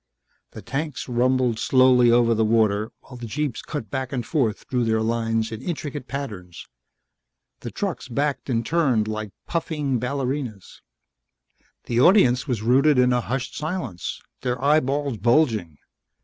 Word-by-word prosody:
The 110 Hz, -, -9 dB
tanks 140 Hz, +6 st, -4 dB
rumbled 125 Hz, -1 st, +1 dB
slowly 130 Hz, -2 st, +5 dB
over 115 Hz, 0 st, +4 dB
the 110 Hz, 0 st, +1 dB
water 110 Hz, -1 st, +2 dB
while 125 Hz, -, -12 dB
the 120 Hz, -1 st, -7 dB
jeeps 135 Hz, 0 st, -3 dB
cut 145 Hz, -8 st, -6 dB
back 130 Hz, -2 st, -3 dB
and 125 Hz, -4 st, -3 dB
forth 120 Hz, -9 st, -1 dB
through 125 Hz, -3 st, 0 dB
their 110 Hz, -1 st, +1 dB
lines 115 Hz, 0 st, -1 dB
in 110 Hz, 0 st, -6 dB
intricate 145 Hz, -3 st, -5 dB
patterns. 105 Hz, -11 st, -6 dB, 0.9 s
The -, -, -6 dB
trucks -, -, -4 dB
backed 140 Hz, +2 st, -2 dB
and 115 Hz, -2 st, 0 dB
turned 130 Hz, -10 st, +1 dB
like 110 Hz, -1 st, -4 dB
puffing 150 Hz, -6 st, -2 dB
ballerinas. 125 Hz, -, -4 dB, 1.0 s
The 120 Hz, 0 st, -1 dB
audience 130 Hz, -, +5 dB
was 120 Hz, -5 st, -2 dB
rooted 135 Hz, +5 st, +4 dB
in 125 Hz, 0 st, +4 dB
a 125 Hz, -, +1 dB
hushed 130 Hz, +2 st, -4 dB
silence, 155 Hz, -, -4 dB, 0.2 s
their 125 Hz, -1 st, -2 dB
eyeballs 140 Hz, -2 st, +1 dB
bulging. 115 Hz, -, +2 dB
125 Hz, 145 wpm, -23 LUFS, 115-140 Hz, 1.0 s, slowly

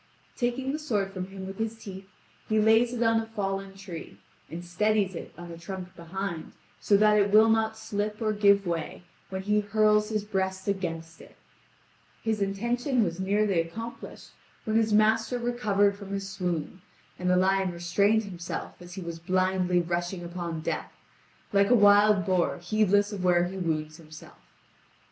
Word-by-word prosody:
Taking 255 Hz, +2 st, -1 dB
the 300 Hz, -, -3 dB
sword 205 Hz, -10 st, -1 dB
from 185 Hz, -1 st, -4 dB
him 195 Hz, 0 st, -8 dB
with 195 Hz, +1 st, -8 dB
his 225 Hz, 0 st, -2 dB
teeth 195 Hz, -3 st, -9 dB, 0.4 s
he 215 Hz, 0 st, +3 dB
lays 225 Hz, +2 st, +4 dB
it 240 Hz, -1 st, -1 dB
on 225 Hz, 0 st, +3 dB
a 225 Hz, -, -4 dB
fallen 195 Hz, -3 st, -3 dB
tree, 190 Hz, -4 st, -9 dB, 0.3 s
and 175 Hz, +2 st, -7 dB
steadies 200 Hz, +2 st, +1 dB
it -, -, -7 dB
on 175 Hz, 0 st, -9 dB
a 165 Hz, -, -9 dB
trunk 185 Hz, +1 st, -7 dB
behind, 170 Hz, 0 st, -5 dB, 0.3 s
so 200 Hz, -, +3 dB
that 210 Hz, 0 st, +5 dB
it 205 Hz, 0 st, +3 dB
will 215 Hz, +2 st, +6 dB
not 220 Hz, 0 st, +1 dB
slip 210 Hz, -1 st, -3 dB
or 215 Hz, -1 st, 0 dB
give 200 Hz, -1 st, +4 dB
way, 170 Hz, 0 st, -3 dB, 0.3 s
when 190 Hz, 0 st, -4 dB
he 210 Hz, +1 st, +2 dB
hurls 210 Hz, 0 st, +2 dB
his 215 Hz, -2 st, -1 dB
breast 190 Hz, -2 st, -2 dB
against 165 Hz, -4 st, -3 dB
it, -, -, -16 dB, 0.9 s
His 220 Hz, -2 st, -1 dB
intention 235 Hz, +6 st, 0 dB
was 170 Hz, -2 st, -3 dB
nearly 195 Hz, -2 st, +2 dB
accomplished 225 Hz, +8 st, -8 dB, 0.3 s
when 220 Hz, -1 st, -2 dB
his 225 Hz, -1 st, +3 dB
master 220 Hz, +3 st, +3 dB
recovered 215 Hz, -5 st, +1 dB
from 200 Hz, -1 st, -10 dB
his 195 Hz, 0 st, -3 dB
swoon, 180 Hz, -2 st, -3 dB, 0.4 s
and 180 Hz, 0 st, 0 dB
the 180 Hz, -, +4 dB
lion 190 Hz, 0 st, +2 dB
restrained 200 Hz, +6 st, +2 dB
himself 180 Hz, -3 st, -6 dB
as 175 Hz, 0 st, -10 dB
he 190 Hz, -, -6 dB
was 170 Hz, -1 st, -6 dB
blindly 185 Hz, 0 st, +1 dB
rushing 175 Hz, +1 st, -3 dB
upon 170 Hz, -2 st, -5 dB
death, -, -, -3 dB, 0.6 s
like 200 Hz, 0 st, +4 dB
a 245 Hz, -, +6 dB
wild 205 Hz, -2 st, +5 dB
boar 185 Hz, -2 st, +1 dB
heedless 205 Hz, +2 st, +2 dB
of 190 Hz, -3 st, -4 dB
where 175 Hz, -1 st, +4 dB
he 185 Hz, +2 st, -4 dB
wounds 155 Hz, -3 st, -2 dB
himself. 155 Hz, -2 st, -14 dB
195 Hz, 170 wpm, -27 LUFS, 180-215 Hz, 0.9 s, will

